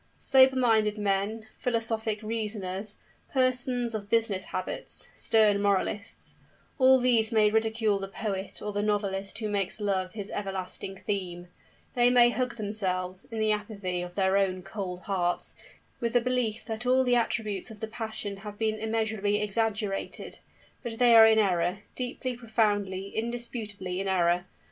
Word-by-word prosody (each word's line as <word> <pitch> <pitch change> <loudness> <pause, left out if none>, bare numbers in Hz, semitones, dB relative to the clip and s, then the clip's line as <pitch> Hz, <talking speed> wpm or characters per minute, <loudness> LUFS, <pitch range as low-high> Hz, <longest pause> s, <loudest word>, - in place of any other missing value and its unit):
Sober 265 0 +5
minded 220 -4 +3
men, 205 +2 -1
philosophic 225 -2 -1
reasoners, 210 -2 -3 0.4
persons 255 -2 +1
of 205 -2 -5
business 220 -4 +1
habits, 185 - -5
stern 210 -2 +3
moralists 200 +1 -1 0.4
all 260 0 +7
these 245 -3 +3
may 215 -2 +4
ridicule 220 -2 +1
the 195 - -4
poet 195 -1 -4
or 210 0 -3
the 205 - 0
novelist 200 -1 -1
who 215 -1 -3
makes 200 -1 -1
Love 190 -3 -1
his 205 -2 -3
everlasting 195 -1 -5
theme; 180 -3 -4 0.4
they 245 0 +4
may 240 -1 +6
hug 250 -1 -2
themselves, 190 -3 -3
in 225 - -8
the 215 0 +2
apathy 205 -4 -2
of 175 0 -7
their 190 0 +2
own 185 -2 0
cold 195 -2 -5
hearts, 180 -3 -1 0.5
with 235 -1 -1
the 245 - +4
belief 240 -3 -1
that 225 +1 -4
all 260 +1 +4
the 245 -1 +3
attributes 225 -3 -1
of 220 -2 -11
the 220 - -3
passion 220 -2 -4
have 205 +1 -9
been 220 -1 0
immensely 220 -2 0
exaggerated; 210 -1 -2 0.4
but 235 -3 -5
they 240 -1 +6
are 225 -1 +10
in 220 0 +5
error, 185 -1 +1
deeply, 250 0 -3
profoundly, 205 -4 -1
indisputably 220 -5 -3
in 195 - -2
error. 175 -1 +2
210 Hz, 150 wpm, -28 LUFS, 195-230 Hz, 0.5 s, are